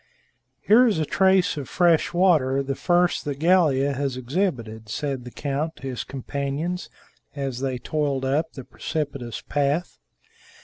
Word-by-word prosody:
"Here 245 Hz, +4 st, +6 dB
is 215 Hz, -, +1 dB
a 155 Hz, -, 0 dB
trace 190 Hz, 0 st, +3 dB
of 140 Hz, -, -5 dB
fresh 170 Hz, -3 st, +3 dB
water, 155 Hz, -7 st, +3 dB
the 135 Hz, 0 st, -2 dB
first 175 Hz, +4 st, +2 dB
that 145 Hz, -2 st, -3 dB
Gallia 150 Hz, -5 st, +3 dB
has 135 Hz, -1 st, -2 dB
exhibited," 120 Hz, -, -2 dB
said 135 Hz, 0 st, -3 dB
the -, -, -6 dB
count 145 Hz, +4 st, -3 dB
to -, -, -18 dB
his 125 Hz, -2 st, -4 dB
companions, 140 Hz, +6 st, -4 dB, 0.5 s
as 135 Hz, -3 st, -3 dB
they 130 Hz, -1 st, -2 dB
toiled 140 Hz, 0 st, -1 dB
up 150 Hz, +5 st, 0 dB
the 135 Hz, -, -8 dB
precipitous 140 Hz, -5 st, -4 dB
path. 145 Hz, +4 st, -1 dB
145 Hz, 145 wpm, -24 LUFS, 135-170 Hz, 0.5 s, Here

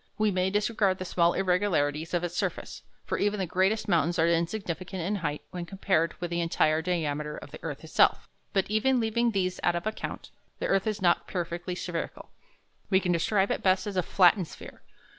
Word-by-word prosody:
We 215 Hz, -1 st, +2 dB
may 185 Hz, 0 st, +1 dB
disregard 205 Hz, -1 st, +1 dB
the 185 Hz, -, -5 dB
small 170 Hz, -1 st, +2 dB
irregularities 180 Hz, -5 st, +1 dB
of 175 Hz, -, 0 dB
its 175 Hz, 0 st, -3 dB
surface, -, -, -3 dB, 0.2 s
for -, -, -2 dB
even 205 Hz, 0 st, +1 dB
the 190 Hz, -, 0 dB
greatest 190 Hz, +6 st, +1 dB
mountains 170 Hz, -2 st, +2 dB
are 165 Hz, -, +3 dB
insignificant 175 Hz, +1 st, -2 dB
in 205 Hz, +4 st, -1 dB
height 150 Hz, -5 st, -3 dB
when 175 Hz, -1 st, -5 dB
compared 185 Hz, -4 st, 0 dB
with 175 Hz, -1 st, -4 dB
the 170 Hz, 0 st, 0 dB
entire 160 Hz, -1 st, +2 dB
diameter 150 Hz, -4 st, -2 dB
of -, -, -10 dB
the -, -, -9 dB
earth -, -, -6 dB
itself. -, -, +3 dB, 0.2 s
But 195 Hz, -2 st, +1 dB
even 250 Hz, +4 st, +3 dB
leaving 235 Hz, +1 st, +1 dB
these 185 Hz, -4 st, -1 dB
out 175 Hz, -, +2 dB
of 170 Hz, -, -3 dB
account, 215 Hz, 0 st, -5 dB, 0.3 s
the -, -, -3 dB
earth 195 Hz, +1 st, +1 dB
is 215 Hz, -2 st, -2 dB
not 175 Hz, -1 st, +3 dB
perfectly 175 Hz, 0 st, -3 dB
spherical. 175 Hz, -2 st, -5 dB, 0.6 s
We 190 Hz, -, +4 dB
can 180 Hz, -2 st, -1 dB
describe 190 Hz, +4 st, +2 dB
it -, -, -1 dB
best 185 Hz, 0 st, +2 dB
as 205 Hz, -2 st, -4 dB
a 185 Hz, -, +3 dB
flattened 180 Hz, 0 st, +4 dB
sphere. -, -, -12 dB
185 Hz, 200 wpm, -28 LUFS, 170-200 Hz, 0.6 s, We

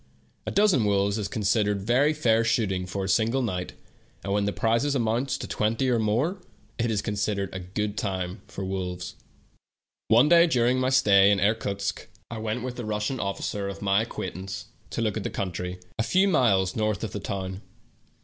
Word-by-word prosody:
A -, -, -1 dB
dozen 200 Hz, -, +4 dB
wolves 100 Hz, +1 st, +1 dB
is 100 Hz, -, -2 dB
con 105 Hz, +1 st, -4 dB
sidered 105 Hz, 0 st, +2 dB
very 120 Hz, +9 st, +2 dB
fair 115 Hz, -7 st, +2 dB
shooting 95 Hz, -5 st, 0 dB
for 95 Hz, +1 st, -3 dB
a -, -, -2 dB
single 115 Hz, +6 st, +2 dB
night, 90 Hz, -5 st, -3 dB, 0.5 s
and 100 Hz, -, -2 dB
when 100 Hz, 0 st, +1 dB
the 100 Hz, -, 0 dB
prizes 115 Hz, +7 st, +1 dB
amount 120 Hz, +2 st, 0 dB
to -, -, -2 dB
twenty 115 Hz, +5 st, 0 dB
or 120 Hz, -, +2 dB
more, 125 Hz, -, 0 dB, 0.4 s
it 120 Hz, 0 st, +1 dB
is 105 Hz, -2 st, 0 dB
considered 100 Hz, -2 st, -2 dB
a 95 Hz, -, -4 dB
good 100 Hz, +3 st, -3 dB
time 95 Hz, -1 st, -3 dB
for 95 Hz, -, -6 dB
wolves. 90 Hz, -2 st, -4 dB, 0.9 s
One 120 Hz, +6 st, +5 dB
day 170 Hz, +1 st, +6 dB
during 125 Hz, -3 st, +2 dB
my 130 Hz, 0 st, +1 dB
stay 100 Hz, -7 st, +5 dB
in 100 Hz, -1 st, +3 dB
Irkutsk 100 Hz, -1 st, -1 dB, 0.2 s
I 115 Hz, -, -4 dB
w^ent 110 Hz, +2 st, -3 dB
with 125 Hz, -1 st, -5 dB
a -, -, -3 dB
Russian 105 Hz, +4 st, -2 dB
officer 100 Hz, 0 st, -3 dB
of 100 Hz, +1 st, -7 dB
my 100 Hz, +1 st, +3 dB
acquaintance 95 Hz, -2 st, -6 dB, 0.2 s
to 115 Hz, -, -2 dB
look 110 Hz, -1 st, -1 dB
at 110 Hz, -, -3 dB
the -, -, -2 dB
country, 90 Hz, -1 st, -4 dB, 0.2 s
a -, -, +3 dB
few 185 Hz, -, +3 dB
miles 100 Hz, -, +3 dB
north 110 Hz, -2 st, -1 dB
of 110 Hz, -, -3 dB
the 105 Hz, -, -4 dB
town. 95 Hz, -1 st, -4 dB
105 Hz, 190 wpm, -26 LUFS, 100-120 Hz, 0.9 s, day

